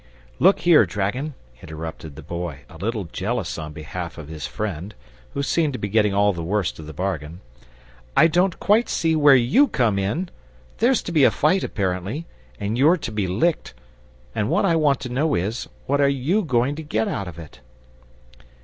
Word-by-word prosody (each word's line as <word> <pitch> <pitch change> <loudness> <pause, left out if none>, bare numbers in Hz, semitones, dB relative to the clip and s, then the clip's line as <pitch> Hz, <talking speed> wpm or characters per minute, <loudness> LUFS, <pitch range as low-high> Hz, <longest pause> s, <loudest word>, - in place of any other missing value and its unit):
"Look 190 +3 +5
here, 170 -3 +6
dragon," 125 +9 -2 0.3
interrupted 80 -1 -8
the 80 - -10
Boy, 85 -3 -5
a 80 - -14
little 110 +4 -2
jealous 95 +2 -3
on 75 -1 -6
behalf 85 +3 -7
of 75 -2 -9
his 80 -2 -5
friend, 100 -2 -5 0.4
who 140 - -1
seemed 155 0 +1
to - - -3
be 100 - -4
getting 105 0 +3
all 100 +1 +3
the 85 - -5
worst 95 +1 -1
of 75 - -9
the - - -7
bargain: 85 -1 -4 0.8
"I - - +8
don't 175 +2 +2
quite 220 +4 +3
see 160 -1 +1
where 145 -3 +7
YOU 130 - +4
come 115 - +1
in! 150 - -2 0.5
There's 245 +3 +3
to - - -5
be 155 -4 +4
a - - +7
fight, 175 +6 +2
apparently, 100 - -2 0.3
and 105 +4 -2
you're 160 +7 +5
to 115 -8 -5
be 105 -3 -1
licked; 115 - 0 0.6
and 105 -1 -1
what - - +2
I 170 -4 +3
want 145 -4 +2
to 130 - -5
know 140 +5 +1
is, 105 +8 -2 0.2
what 140 +1 +1
are 140 - +4
YOU 140 +10 +1
going 125 -1 +1
to - - -4
get 110 -8 -1
out 100 -4 -3
of 85 -2 -9
it?" 80 -6 -11
110 Hz, 195 wpm, -23 LUFS, 90-150 Hz, 0.8 s, I